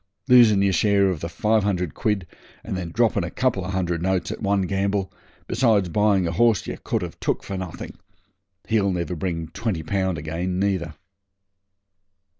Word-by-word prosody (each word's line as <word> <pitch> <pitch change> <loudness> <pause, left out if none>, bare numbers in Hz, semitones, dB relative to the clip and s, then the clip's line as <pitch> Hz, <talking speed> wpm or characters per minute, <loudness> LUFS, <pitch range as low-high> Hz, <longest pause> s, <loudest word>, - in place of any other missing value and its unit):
Losin' 115 -6 +6
yer 100 - +3
share 100 +2 +3
of 85 - -4
the 85 - -5
five 110 +3 +1
hundred 90 -6 -1
quid, 105 -4 -1 0.4
and - - -4
then 90 -2 -4
dropping 115 +1 +1
a 85 - -3
couple 115 -3 0
of 95 - -4
hundred 90 -3 -1
notes 90 -2 0
at - - -6
one 100 -2 +1
gamble, 95 0 -1 0.3
besides 110 -6 +2
buying 100 -1 +2
a - - -1
horse 110 +4 +2
yer - - -5
could - - -1
have - - -7
took - - -1
for 100 - -5
nothing. 95 -3 -6 0.7
He'll 105 -3 +2
never 90 0 -2
bring 80 -1 -3
twenty 100 -5 -3
pound 95 +1 -1
again, 85 +4 -3
neither.' 95 -5 -1
95 Hz, 175 wpm, -23 LUFS, 90-105 Hz, 0.7 s, Losin